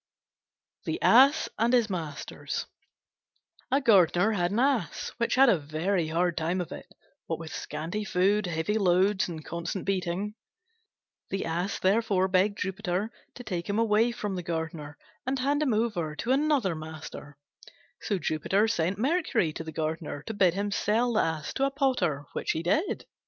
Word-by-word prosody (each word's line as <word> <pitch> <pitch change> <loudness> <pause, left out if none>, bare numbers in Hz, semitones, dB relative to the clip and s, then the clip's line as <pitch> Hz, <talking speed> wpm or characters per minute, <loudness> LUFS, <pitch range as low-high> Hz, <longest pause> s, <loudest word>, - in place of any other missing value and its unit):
THE - - -2
ASS 275 +6 +6
AND 235 +2 +2
HIS 240 -3 +4
MASTERS 165 -7 -4 1.0
A 270 - +3
Gardener 200 - +4
had 175 -5 +1
an 205 - -2
Ass 250 - 0
which 235 -1 +1
had 270 +1 +6
a 195 -8 +4
very 160 +4 -1
hard 170 +2 0
time 170 +3 -1
of 175 - -4
it, - - -8 0.4
what 165 - -2
with 160 0 -8
scanty 165 +8 -4
food, 195 +1 +2
heavy 175 +6 -1
loads, 190 +1 +3
and 160 -3 -7
constant 170 +3 -4
beating. 195 +1 -1 1.0
The 195 - -2
Ass 175 +4 -2
therefore 195 -1 +2
begged 195 +2 +2
Jupiter 190 +2 -2 0.2
to 245 - -8
take 180 -6 -4
him 200 - 0
away 225 +1 +3
from 210 -4 -4
the 180 - -3
Gardener 160 -3 -5 0.3
and 265 +1 0
hand 285 +3 +1
him 290 -4 +2
over 180 -9 -1
to 230 +11 -2
another 275 - +2
master. 155 -2 -9 0.6
So 205 - -1
Jupiter 190 +6 +1
sent 185 -3 0
Mercury 265 - +1
to 165 - -5
the 160 - -7
Gardener 155 -2 -3
to 225 - -5
bid 185 -4 +3
him 200 +1 -1
sell 230 +5 +1
the 215 - +3
Ass 160 -2 -2
to 270 - +1
a - - +2
Potter, 250 - 0
which - - -1
he 160 - -3
did. 310 - 0
190 Hz, 170 wpm, -28 LUFS, 165-225 Hz, 1.0 s, ASS